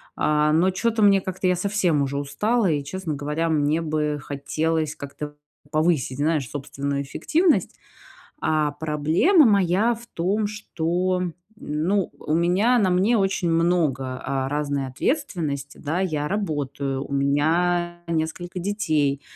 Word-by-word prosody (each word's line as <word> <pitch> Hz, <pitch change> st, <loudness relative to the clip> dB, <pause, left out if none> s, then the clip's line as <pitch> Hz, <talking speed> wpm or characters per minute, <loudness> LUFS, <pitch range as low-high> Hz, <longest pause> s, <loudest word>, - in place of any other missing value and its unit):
А, 150 Hz, 0 st, +2 dB
но 170 Hz, +4 st, +4 dB
чё-то 225 Hz, +3 st, 0 dB
мне, 200 Hz, -1 st, +6 dB
как-то, 185 Hz, 0 st, -3 dB
я 180 Hz, -, +3 dB
совсем 185 Hz, -6 st, +1 dB
уже 140 Hz, 0 st, -1 dB
устала 195 Hz, +8 st, +1 dB
и, 145 Hz, -2 st, -1 dB
честно 165 Hz, +2 st, -4 dB
говоря, 150 Hz, +4 st, -2 dB
мне 155 Hz, +1 st, +1 dB
бы 150 Hz, -2 st, -1 dB
хотелось 155 Hz, +3 st, -2 dB
как-то 145 Hz, 0 st, -7 dB, 0.3 s
повысить, 155 Hz, -4 st, +1 dB
знаешь, 150 Hz, -2 st, 0 dB
собственную 140 Hz, 0 st, -3 dB
эффективность. 320 Hz, -, +1 dB, 0.7 s
А 155 Hz, -2 st, +1 dB
проблема 160 Hz, -, +3 dB
моя 200 Hz, +2 st, +3 dB
в 235 Hz, +1 st, -12 dB
том, 200 Hz, +5 st, 0 dB
что, 180 Hz, -3 st, -1 dB, 0.3 s
ну, 180 Hz, +1 st, -1 dB
у 155 Hz, -, -2 dB
меня, 185 Hz, +9 st, +3 dB
на 190 Hz, -3 st, +2 dB
мне 190 Hz, +6 st, +3 dB
очень 195 Hz, -3 st, +1 dB
много, 155 Hz, -7 st, +1 dB
а, 135 Hz, -1 st, -2 dB
разной 145 Hz, -1 st, -1 dB
ответственности, 150 Hz, -, -2 dB
да. 160 Hz, +4 st, -2 dB
Я 155 Hz, -6 st, -1 dB
работаю, 140 Hz, -8 st, -2 dB
у -, -, -10 dB
меня 170 Hz, +5 st, +1 dB
несколько 170 Hz, +2 st, -3 dB
детей, 155 Hz, -8 st, 0 dB
160 Hz, 135 wpm, -24 LUFS, 145-185 Hz, 0.7 s, мне